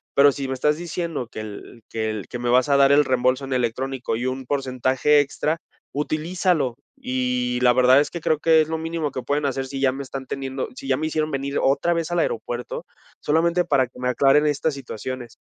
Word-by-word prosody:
pero 140 Hz, +1 st, +7 dB
si 135 Hz, 0 st, -4 dB
me -, -, -1 dB
estás 150 Hz, +3 st, +1 dB
diciendo 165 Hz, -5 st, -4 dB
que -, -, -7 dB
el 110 Hz, +2 st, -9 dB
que 110 Hz, -1 st, -2 dB
el 105 Hz, -2 st, -6 dB
que -, -, -5 dB
me 120 Hz, 0 st, -1 dB
vas 125 Hz, +2 st, +4 dB
a 140 Hz, -, +5 dB
dar 140 Hz, 0 st, +5 dB
el 145 Hz, +1 st, +5 dB
reembolso 130 Hz, +1 st, +1 dB
en 135 Hz, -, -4 dB
electrónico 130 Hz, +1 st, -1 dB
y 120 Hz, -, -3 dB
un 130 Hz, +1 st, -3 dB
porcentaje 130 Hz, +2 st, +2 dB
extra, 145 Hz, +3 st, -1 dB, 0.4 s
utilízalo, 155 Hz, -2 st, 0 dB, 0.2 s
y 125 Hz, -1 st, -1 dB
la 125 Hz, -1 st, +5 dB
verdad 130 Hz, +2 st, +6 dB
es 145 Hz, -, -3 dB
que 170 Hz, -, -6 dB
creo 155 Hz, -1 st, +2 dB
que 160 Hz, 0 st, +5 dB
es 155 Hz, -, -1 dB
lo 160 Hz, -, -1 dB
mínimo 160 Hz, -2 st, -3 dB
que 130 Hz, -1 st, -5 dB
pueden 145 Hz, +1 st, 0 dB
hacer 135 Hz, 0 st, -2 dB
si 135 Hz, +1 st, -5 dB
ya 135 Hz, -1 st, +4 dB
me 135 Hz, +2 st, -5 dB
están 135 Hz, 0 st, -7 dB
teniendo 135 Hz, -1 st, -4 dB
si -, -, -8 dB
ya 135 Hz, -, +3 dB
me 155 Hz, +2 st, -1 dB
hicieron 155 Hz, 0 st, -1 dB
venir 140 Hz, +1 st, -2 dB
otra 140 Hz, +5 st, +2 dB
vez 165 Hz, 0 st, -2 dB
al 175 Hz, -, +1 dB
aeropuerto, 120 Hz, -4 st, -3 dB, 0.4 s
solamente 170 Hz, +3 st, +2 dB
para 140 Hz, -6 st, +2 dB
que 125 Hz, -, -19 dB
me 125 Hz, 0 st, 0 dB
aclaren 140 Hz, +4 st, +4 dB
estas 150 Hz, +1 st, 0 dB
situaciones, 130 Hz, -2 st, -7 dB
135 Hz, 220 wpm, -23 LUFS, 125-150 Hz, 0.4 s, pero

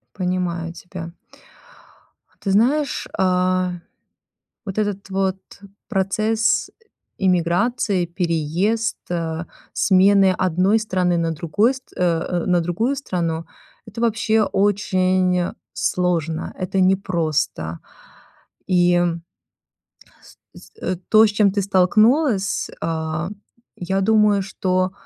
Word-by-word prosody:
Понимаю 180 Hz, -3 st, -2 dB
тебя. 175 Hz, -1 st, -9 dB, 1.3 s
Ты 195 Hz, -, -1 dB
знаешь, 270 Hz, +9 st, +1 dB
а, 185 Hz, -1 st, +1 dB, 0.9 s
вот 195 Hz, 0 st, -6 dB
этот 205 Hz, -2 st, -2 dB
вот 190 Hz, 0 st, 0 dB, 0.5 s
процесс 215 Hz, +3 st, +1 dB, 0.5 s
эмиграции, 185 Hz, +2 st, +1 dB
переезд, 175 Hz, +5 st, -1 dB
э, 165 Hz, -1 st, -3 dB, 0.3 s
смены 195 Hz, 0 st, +4 dB
одной 185 Hz, +4 st, +2 dB
страны 185 Hz, -5 st, 0 dB
на 165 Hz, -1 st, 0 dB
другой 170 Hz, -, +1 dB
стр 260 Hz, -1 st, -13 dB
э, -, -, 0 dB, 0.4 s
э, -, -, -5 dB
на 180 Hz, -1 st, +2 dB
другую 200 Hz, +11 st, -1 dB
страну- 170 Hz, -, -3 dB, 0.4 s
это 215 Hz, +2 st, -7 dB
вообще 225 Hz, -1 st, +2 dB
очень 185 Hz, -3 st, +1 dB, 0.2 s
сложно, 170 Hz, -3 st, -1 dB
это 185 Hz, +1 st, -2 dB
непросто. 165 Hz, -, 0 dB, 0.9 s
И 175 Hz, -1 st, +3 dB, 1.5 s
с, -, -, -15 dB
э, 185 Hz, -, -1 dB
то, 220 Hz, 0 st, +7 dB
с -, -, +2 dB
чем 205 Hz, -1 st, +3 dB
ты 200 Hz, +1 st, 0 dB
столкнулась, 200 Hz, -, +2 dB
а, 160 Hz, +1 st, -2 dB, 0.5 s
я 190 Hz, +2 st, -2 dB
думаю, 210 Hz, -1 st, +3 dB
что 185 Hz, -1 st, -1 dB
185 Hz, 100 wpm, -21 LUFS, 175-205 Hz, 1.5 s, то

